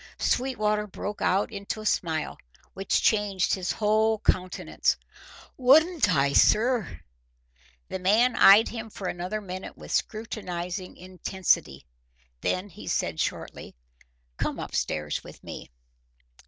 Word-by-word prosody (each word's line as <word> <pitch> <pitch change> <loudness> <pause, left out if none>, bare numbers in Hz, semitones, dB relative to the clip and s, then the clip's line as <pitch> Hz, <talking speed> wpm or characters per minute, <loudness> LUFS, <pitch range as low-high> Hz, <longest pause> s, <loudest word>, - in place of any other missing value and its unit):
Sweetwater 215 -5 0
broke 205 +1 -6
out 195 +4 +1
into 200 +1 -5
a 215 - -8
smile, 160 -5 -1 0.3
which 195 0 0
changed 205 -4 +2
his 185 -2 -1
whole 220 +1 +2
countenance. 185 -3 0 0.6
"Wouldn't 300 - +5
I, 140 0 +2
sir?" 220 - +3 0.9
The 190 - -5
man 220 +7 +3
eyed 205 +3 +7
him 225 -1 -6
for 195 -3 -6
another 180 +5 -3
minute 185 -1 -7
with - - -10
scrutinising 185 -5 -3
intensity. 185 - -1 0.6
Then 185 +2 -1
he - - -12
said - - -1
shortly: - - -4 0.6
"Come - - -2
up - - -6
stairs 75 -1 -2
with - - -13
me." - - -8
200 Hz, 120 wpm, -26 LUFS, 185-220 Hz, 0.9 s, eyed